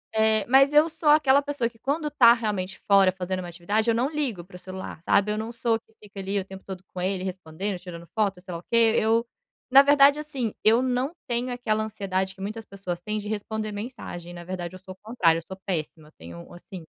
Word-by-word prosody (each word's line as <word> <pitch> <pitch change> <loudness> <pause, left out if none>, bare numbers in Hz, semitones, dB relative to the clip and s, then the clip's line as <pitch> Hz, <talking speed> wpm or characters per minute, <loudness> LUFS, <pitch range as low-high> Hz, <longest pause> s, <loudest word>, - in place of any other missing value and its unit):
Eh, 220 0 +3
mas 270 +3 +5
eu 300 +2 +5
sou 320 -1 -1
aquela 285 -2 +5
pessoa 285 -5 -2
que 230 - -24
quando 300 +6 -2
tá 255 -6 +7
realmente 210 -5 -1
fora 195 -2 +4
fazendo 185 0 -4
uma 175 - -7
atividade, 205 +7 -1
eu 230 - +3
não 250 +4 +1
ligo 275 - -3
pro 180 -1 -12
celular, 185 -2 -8
sabe? 205 +4 +2
Eu - - -3
não 220 +2 -4
sou 230 -1 0
que 220 - -32
fica 200 -1 -11
ali 195 +1 -1
o 190 - -5
tempo 190 0 -11
todo 190 -2 -7
com 180 - -5
ele, 185 0 -1
respondendo, 185 +1 -4
tirando 170 -1 -10
foto, 200 -4 0
sei 180 0 -9
lá 170 - -4
o - - -34
quê. 230 +1 +3
Eu 225 +2 +2 0.4
na 265 +1 +9
verdade, 285 0 +6
assim, 275 -7 -3
eu 225 +3 +5
não 255 +2 0 0.2
tenho 245 0 -1
aquela 220 -3 -1
ansiedade 190 -3 -2
que 190 - -23
muitas 215 +3 -5
pessoas 190 -4 -6
têm 210 +4 -3
de 210 0 -5
responder 215 0 -4
mensagem. 205 -6 -7
Na 175 0 -9
verdade, 180 0 -5
eu - - -10
sou 185 0 -10
o - - -25
contrário. 180 -8 +2
Eu - - -13
sou 190 - -9
péssima, 160 -4 -4
eu - - -19
tenho 85 +1 -11
assim 175 0 -10
210 Hz, 235 wpm, -25 LUFS, 185-240 Hz, 0.4 s, na